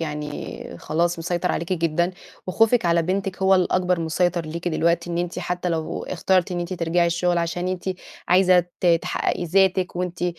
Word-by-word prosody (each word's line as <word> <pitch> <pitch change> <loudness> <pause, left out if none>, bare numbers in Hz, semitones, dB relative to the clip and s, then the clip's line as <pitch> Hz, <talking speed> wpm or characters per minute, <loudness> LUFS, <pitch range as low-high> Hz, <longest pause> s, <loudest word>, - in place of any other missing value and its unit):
يعني 150 -2 -6
خلاص 170 +2 0
مسيطر 175 +1 -1
عليكِ 170 +2 -2
جدًا 170 +1 0 0.3
وخوفِك 225 +2 +3
على 170 0 +3
بنتِك 190 +2 -2
هو 190 0 +5
الأكبر 180 -1 +1
مسيطر 170 +1 0
ليكِ 170 +3 -4
دلوقتي 170 +1 0
إن 170 - -2
أنتِ 175 0 -3
حتى 180 0 -2
لو 160 -2 -2
اخترتِ 185 0 +1
إن 175 - -2
أنتِ 175 +2 -4
ترجعي 170 0 +1
الشغل 175 +1 +1
عشان 175 +2 -2
أنتِ 185 -1 -4 0.4
عايزة 180 0 +5 0.2
ت 180 - 0 0.2
تحققي - - -1
ذاتِك 185 0 +2
وأنتِ 180 -1 -3
175 Hz, 170 wpm, -23 LUFS, 170-185 Hz, 0.4 s, هو